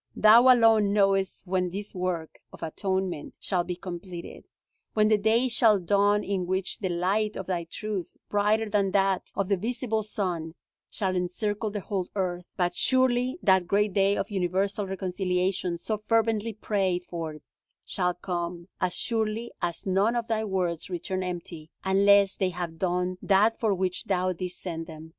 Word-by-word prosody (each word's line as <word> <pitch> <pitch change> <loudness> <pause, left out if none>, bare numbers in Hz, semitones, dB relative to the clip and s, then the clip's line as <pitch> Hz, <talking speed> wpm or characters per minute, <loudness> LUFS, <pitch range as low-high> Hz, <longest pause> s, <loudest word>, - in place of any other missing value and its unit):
Thou 235 +4 +7
alone 225 -4 +5
knowest 195 -2 +1
when 180 -1 0
this 200 +3 -6
work 180 -4 -3
of - - -11
atonement 190 -1 -3
shall 180 -3 0
be 180 0 -4
completed; 175 -1 -8 0.5
when 215 0 +4
the 215 - +5
day 225 +4 +3
shall 230 -3 +4
dawn 205 +3 +2
in 190 -3 -2
which 185 +1 -1
the 190 - -2
light 195 +5 0
of 190 - -5
Thy 175 -2 -2
truth, 195 +1 -5
brighter 210 +2 +1
than 200 -2 +1
that 195 -1 +1
of 195 - 0
the 200 -1 +2
visible 225 +2 -1
sun, 180 -6 -3 0.3
shall 190 -3 -1
encircle 205 +4 -2
the 205 0 -4
whole 190 -2 -3
earth. 180 -2 -3
But 175 -1 +1
surely 255 - +2
that 190 -3 +4
great 205 +1 +2
day 200 +1 +3
of - - -3
universal 195 +2 -1
reconciliation, 185 -1 -1
so 215 +5 -3
fervently 225 -1 +1
prayed 190 -4 -1
for, 165 -3 -5 0.5
shall 180 -2 -1
come, 175 -1 -4
as 180 -1 0
surely 225 0 -1
as 170 -1 -3
none 195 +5 +2
of 235 -1 -1
Thy 220 -2 0
words 185 -5 -2
return 185 +1 -3
empty, 170 -3 -6
unless 200 0 +5
they 190 - 0
have 175 -2 -5
done 180 0 -1
that 210 +3 +3
for 220 -3 +1
which 185 -1 -2
Thou 185 -1 0
didst 180 +1 -6
send 165 -3 -5
them. 160 0 -10
190 Hz, 165 wpm, -27 LUFS, 180-210 Hz, 0.5 s, Thou